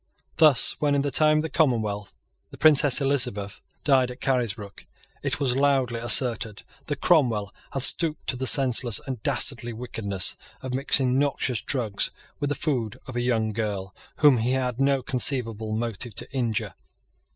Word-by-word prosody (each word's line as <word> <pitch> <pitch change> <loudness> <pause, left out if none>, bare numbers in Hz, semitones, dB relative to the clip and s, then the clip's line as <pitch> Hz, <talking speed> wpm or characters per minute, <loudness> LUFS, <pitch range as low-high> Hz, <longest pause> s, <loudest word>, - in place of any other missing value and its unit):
Thus 150 -6 +5
when, 145 -1 +1
in 140 - +1
the 145 - -2
time 155 +1 +4
of - - +1
the 160 - -4
Commonwealth, 110 -9 -1 0.3
the - - -13
Princess 145 -3 +5
Elizabeth 115 -8 -1 0.2
died 130 -3 +3
at 125 - -10
Carisbrook, 115 -6 -3 0.4
it - - -1
was 130 -4 0
loudly 135 -4 +1
asserted 115 -2 0 0.2
that 145 -3 -4
Cromwell 120 - +2 0.2
had 135 - 0
stooped 155 +2 0
to - - 0
the 130 +1 -2
senseless 125 -3 +3
and 130 -5 -6
dastardly 120 -3 +1
wickedness 105 -5 -1 0.3
of 130 -1 -5
mixing 130 -1 +1
noxious 135 -4 -1
drugs 115 -7 -1 0.3
with 145 - -2
the 145 - -1
food 120 -10 -3
of 130 - -9
a 120 - -1
young 110 -3 0
girl 100 -4 -4 0.2
whom 145 -5 +4
he 120 +3 0
had 125 -1 -2
no 135 -1 +1
conceivable 115 -4 0
motive 115 -1 -3
to - - 0
injure. 120 -5 -2
125 Hz, 165 wpm, -24 LUFS, 110-140 Hz, 0.4 s, Thus